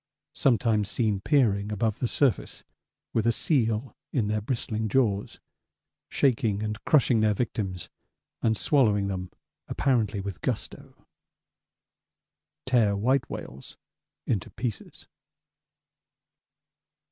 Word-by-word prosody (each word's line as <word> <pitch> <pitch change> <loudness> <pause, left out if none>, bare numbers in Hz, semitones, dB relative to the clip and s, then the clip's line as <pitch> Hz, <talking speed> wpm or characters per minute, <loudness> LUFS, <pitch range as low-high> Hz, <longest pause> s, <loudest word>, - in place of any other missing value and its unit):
Sometimes 115 -5 +2
seen 110 -5 0
peering 105 -5 +2
above 105 0 -1
the 125 - 0
surface 135 0 0 0.5
with 115 0 +1
a - - +5
seal 115 -3 0 0.2
in 115 -7 0
their 105 0 0
bristling 110 -2 -2
jaws, 105 -4 0 0.7
shaking 110 -6 +1
and 105 -1 -4
crushing 125 -6 +4
their 105 -1 +2
victims 95 -6 -3 0.5
and 110 -1 +2
swallowing 105 -9 +2
them 90 -2 -4 0.4
apparently 110 -7 0
with 100 -2 -6
gusto. - - -5 1.6
Tear 115 -6 +3
white 125 +5 +1
whales 65 +2 -8 0.5
into 100 -6 -1
pieces. 115 -2 -6
110 Hz, 100 wpm, -27 LUFS, 100-125 Hz, 1.6 s, a